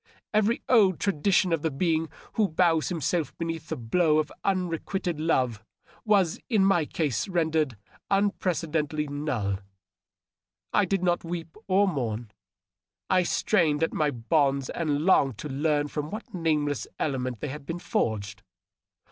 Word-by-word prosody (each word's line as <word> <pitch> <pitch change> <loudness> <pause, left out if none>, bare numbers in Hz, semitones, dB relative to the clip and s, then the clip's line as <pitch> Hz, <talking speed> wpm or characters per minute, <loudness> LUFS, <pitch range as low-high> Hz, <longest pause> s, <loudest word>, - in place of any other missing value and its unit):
Every 215 +3 +2
old 205 -8 +4
tradition 190 0 +2
of 165 - 0
the 160 - 0
being 160 +2 0 0.2
who 215 -2 +2
bows 165 -2 +2
himself 170 -2 -1
beneath 165 -1 -4
the - - -1
blow 155 +7 +2
of 155 -1 0
unrequited 180 -2 -1
love 125 -9 +1 0.4
was 195 -6 +3
in 210 -5 +4
my 175 -5 +3
case 150 - -1
rendered 160 - 0 0.3
unprecedentedly 165 -6 0
null. 130 -10 -2 1.1
I 205 - +4
did 190 0 -1
not 175 -1 +1
weep 165 -1 -6
or 195 +1 +4
mourn; 120 - -3 0.8
I 185 -1 +5
strained 165 -4 +2
at 165 - 0
my 150 -1 +1
bonds 140 +2 +1
and 150 -3 -1
longed 135 - +4
to 150 - -6
learn 145 +1 +1
from 150 0 -4
what 215 +4 -7
nameless 150 - 0
element 130 -5 -2
they 150 - -4
had 140 +1 -8
been 170 - -3
forged. 100 - -2
160 Hz, 140 wpm, -27 LUFS, 145-180 Hz, 1.1 s, I